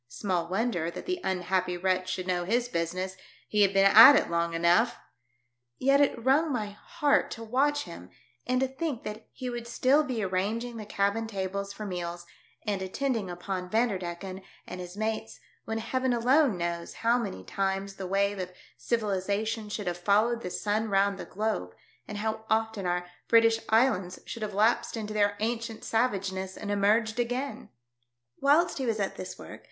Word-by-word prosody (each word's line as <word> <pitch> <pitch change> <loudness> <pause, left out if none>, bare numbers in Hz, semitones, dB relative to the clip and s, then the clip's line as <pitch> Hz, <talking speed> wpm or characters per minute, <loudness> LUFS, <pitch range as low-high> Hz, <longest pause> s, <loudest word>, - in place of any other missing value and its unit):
Small 180 - -2
wonder 185 -3 0
that - - -8
the 365 -1 -2
unhappy 180 -1 0
wretch 185 0 0
should 185 0 -3
know 180 -1 0
hir 230 +7 +2
business! 185 +3 -2 0.3
He 210 - +1
had 200 -1 +5
been 195 0 +4
at 225 +8 +10
it - - +1
long 170 0 0
enough! 175 +8 +3 0.8
Yet 275 +2 +4
it 260 -4 +1
wrung 295 +4 +4
my 215 -5 -2
heart 280 +7 +1
to 230 - -8
watch 285 +6 +1
him 95 - -10 0.4
and 255 0 +2
to 265 - +2
think 265 -1 -4
that 210 +1 -7
he 255 - -6
would 240 -1 -4
still 265 +5 +3
be 255 -6 -3
arrangfino 210 +6 -1
the 215 -2 -7
cabin 205 +2 0
tables 200 -1 -3
for 210 +1 -7
meals, 175 -2 -5 0.4
and 200 -2 -1
attending 220 +1 -2
upon 180 +1 -4
Vanderdecken 190 -4 -1 0.2
and 180 0 -7
his 180 +2 -9
mates 220 +1 -3 0.3
when 225 - -2
Heaven 255 +3 0
alone 250 - +3
knows 170 0 -3
how 235 +2 +4
many 95 - -5
times 195 - -2
the 190 - -5
wave 200 +1 +1
of 180 0 -4 0.3
civilisation 215 0 -1
should 205 0 -4
have 175 -1 -2
followed 215 +5 +2
the 180 - -4
sun 215 +4 -1
round 195 0 +2
the - - -5
globe, 200 - -3 0.3
and 210 - -6
how 220 +1 -2
often 220 -3 0
our 175 0 0 0.2
British 230 -1 +5
Islands 220 -6 +2
should 230 - -7
have 210 -2 -4
lapsed 225 +3 +2
into 215 -1 -4
their 205 -1 +2
ancient 230 0 -2
savageness 195 -5 -1
and 205 - -4
emerged 215 +3 +2
again. 250 +4 -2 0.7
Whilst 295 +4 +3
he 260 - -1
was 220 -2 0
at 195 - -1
this - - -7
work. - - -10
210 Hz, 175 wpm, -28 LUFS, 185-235 Hz, 0.8 s, at